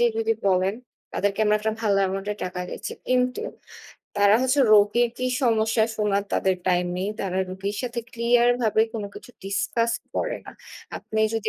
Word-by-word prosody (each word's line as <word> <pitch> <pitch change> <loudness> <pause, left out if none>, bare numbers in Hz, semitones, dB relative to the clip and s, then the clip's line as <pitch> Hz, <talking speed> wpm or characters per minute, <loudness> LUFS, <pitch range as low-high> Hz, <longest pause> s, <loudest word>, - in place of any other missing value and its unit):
যে 240 - +5
যদি 225 0 +2
বলেন, 190 +1 +2 0.4
তাদেরকে 200 0 -1
আমরা 210 0 +4
একটা 220 +1 0
ভালো 205 -2 +2
এমাউন্ট 195 +1 -4
এর 210 - -11
টাকা 180 0 -5
দিচ্ছি। - - -5 0.2
কিন্তু 250 +3 +1 0.8
তারা 205 0 +5
হচ্ছে 260 +2 +2
রোগীর 215 +3 +5
কি 255 - -1 0.2
সমস্যা 225 -2 +3
শোনার 200 -2 +1
তাদের 190 -1 +2
টাইম 180 -1 +2
নেই। 190 +2 -2
তারা 190 -1 -2
রোগীর 195 +2 -4
সাথে 240 -1 -3
ক্লিয়ার 235 +1 +3
ভাবে 220 -1 +2
কোন 220 - -3
কিছু - - -11
ডিসকাস 220 +4 0 0.2
করে - - -1
না। - - -9 0.5
আপনি 220 - -3
যদি 225 - -1
215 Hz, 170 wpm, -24 LUFS, 195-235 Hz, 0.8 s, যে